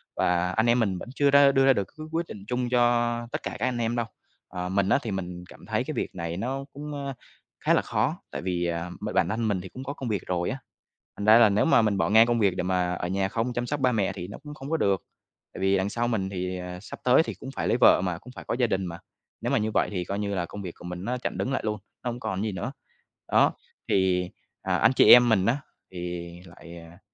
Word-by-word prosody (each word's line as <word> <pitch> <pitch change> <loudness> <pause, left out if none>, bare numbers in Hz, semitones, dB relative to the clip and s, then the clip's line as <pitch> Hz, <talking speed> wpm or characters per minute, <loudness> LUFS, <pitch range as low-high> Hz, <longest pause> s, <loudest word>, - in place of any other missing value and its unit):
và 90 0 +1
anh 110 +4 +1
em 120 +1 +4
mình 100 -5 +1
vẫn - - -8
chưa 140 0 +3
ra 140 0 +7
đưa 135 0 +3
ra 135 - +6
được 100 -5 -2
cái 155 0 -7
quyết 165 +1 -1
định 100 - -9
chung 125 +1 -1
cho 120 -1 +2
tất - - -4
cả - - -3
các 120 - 0
anh 125 - -1
em 115 0 -1
đâu. 120 -1 0 0.4
Ờ, 90 -1 -4
mình 95 0 +1
á - - +4
thì 110 - -3
mình 90 -2 -5
cảm - - -14
thấy - - -1
cái - - -5
việc - - -3
này 85 -1 -4
nó 130 +6 -3
cũng, 145 -1 -6
a, 135 - -3 0.5
khá - - +2
là - - +4
khó, - - 0 0.2
tại - - -4
vì, 90 -1 -1
à, 85 0 -2
b - - -3
bản - - +3
thân 115 +1 -1
mình 100 -4 0
thì 95 - -9
cũng 130 - -8
có 140 +1 -4
công 130 -4 -5
việc 105 -4 -1
rồi 90 -1 -1
á, 130 - -3 0.6
thành 100 - -4
ra 110 +2 +8
là 115 -3 +7
nếu 100 +1 +2
mà 165 - +5
mình 105 -2 +1
bỏ 95 - +1
ngang 110 +2 +7
công 120 -1 +1
việc 100 -4 +2
để 90 - 0
mà 90 -1 0
ở 90 - -3
nhà 95 +1 0
không 115 +4 -2
chăm 120 0 -2
sóc 145 +3 -2
ba 130 - +3
mẹ 105 -5 +1
á - - -2
thì 90 - -6
nó 100 - -8
cũng 150 -1 -8
không 140 -1 -9
có 160 - +2
được. 100 - +1 0.5
Tại - - -8
vì 95 0 +3
đằng 95 +1 0
sau 120 +3 -1
mình 105 -5 -1
thì 90 -1 -3 0.2
sắp - - -9
tới 130 +5 +5
thì - - -5
cũng 130 - -7
phải - - -2
lấy - - +2
vợ - - +7
mà, 90 -2 -2
cũng 125 +6 -13
phải - - -9
có - - -1
gia 120 - +3
đình 95 -3 -1
mà, 85 -1 -6 0.4
nếu - - -1
mà - - +3
như 110 0 0
vậy - - +2
thì 90 -3 -2
coi 100 +3 -3
như 100 -1 -2
là 90 -2 -1
công 105 - -8
việc 90 -3 -5
của - - -13
mình 90 +1 -6
nó 125 +2 -1
chặn 125 - -4
đứng 130 - -1
lại - - 0
luôn, 105 0 -1 0.3
nó 125 - -1
hông 120 - -7
còn 110 -4 -3
gì 110 - -1
nữa. 95 +8 -4 0.6
Đó, - - +4 0.4
thì, 90 -2 +2 0.3
à, - - 0
anh - - +4
chị - - +8
em 120 0 +8
mình 100 -4 +3
á, 120 +4 +2 0.3
thì 90 -1 -5 0.2
lại, 85 -1 -12
à, 85 +1 -13
105 Hz, 285 wpm, -26 LUFS, 90-125 Hz, 0.6 s, ra